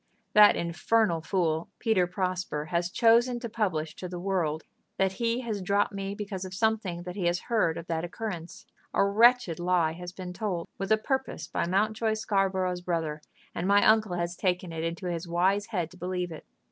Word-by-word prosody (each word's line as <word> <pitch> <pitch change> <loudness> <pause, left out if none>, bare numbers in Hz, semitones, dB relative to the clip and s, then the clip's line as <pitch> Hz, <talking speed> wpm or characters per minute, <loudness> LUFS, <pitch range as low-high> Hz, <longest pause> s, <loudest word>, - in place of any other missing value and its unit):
That 210 -1 +8
infernal 170 +2 +1
fool, 165 -2 0
Peter 210 -6 +2
Prosper, 180 -4 -2
has 170 0 0
chosen 235 +4 +4
to 235 - -4
publish 185 -9 -2
to 180 - -6
the 180 - -5
world 175 -5 -1 0.3
that 190 0 +2
he 230 +5 -1
has 220 -5 -3
dropped 200 +2 +1
me 195 0 -4
because 200 -2 -5
of 185 0 -7
something 205 -5 0
that 180 0 -7
he 190 -4 -2
has 175 0 0
heard 215 -9 +1
of 165 - -6
that 165 -1 -2
occurrence. 175 -2 -6 0.3
A - - +4
wretched 225 -3 +4
lie 175 -2 +2
has 180 +1 -8
been 180 -1 -7
told 180 -3 -3
with 195 +2 -3
a 220 - +6
purpose 265 - -2
by - - -1
Mountjoy 215 +4 +1
Scarborough's 190 -4 0
brother, 165 -4 -2 0.3
and 175 - -2
my 200 0 +5
uncle 215 -4 +4
has 175 0 -2
taken 180 -2 -1
it 160 0 -3
into 165 +3 -3
his 170 0 -3
wise 190 +4 +1
head 180 -8 -2
to 180 - -14
believe 180 0 -3
it. 160 - -10
185 Hz, 190 wpm, -28 LUFS, 175-210 Hz, 0.3 s, That